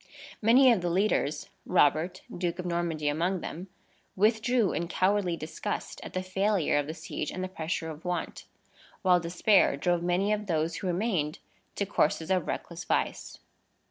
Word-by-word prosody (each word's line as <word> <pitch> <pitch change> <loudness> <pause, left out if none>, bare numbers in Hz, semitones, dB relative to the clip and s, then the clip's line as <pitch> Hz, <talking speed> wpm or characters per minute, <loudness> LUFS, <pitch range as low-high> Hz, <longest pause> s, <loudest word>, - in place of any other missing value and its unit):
Many 250 +4 +6
of 220 -6 +2
the 175 - -1
leaders 180 -4 0
(Robert, 175 +2 +2
Duke 175 -1 -2
of 180 - -5
Normandy, 170 -3 -1
among 170 +5 0
them), 175 +4 -6 0.5
withdrew 220 +1 +2
in 170 - -2
cowardly 185 -1 +1
disgust 155 0 -5
at - - -9
the 185 - -2
failure 190 -4 +1
of 145 - -2
the 155 - -5
siege - - -5
and 185 - -4
the - - -2
pressure 165 -2 -3
of 155 +1 -11
want; 180 -2 -3 0.6
while 180 -2 +5
despair 175 -1 +3
drove 175 +3 +1
many 180 +4 +1
of 210 -1 -3
those 165 -1 0
who 190 - -4
remained 175 -5 0 0.4
to 200 - -1
courses 160 -2 0
of 185 -3 +1
reckless 170 0 -4
vice. - - -2
180 Hz, 165 wpm, -28 LUFS, 165-195 Hz, 0.6 s, Many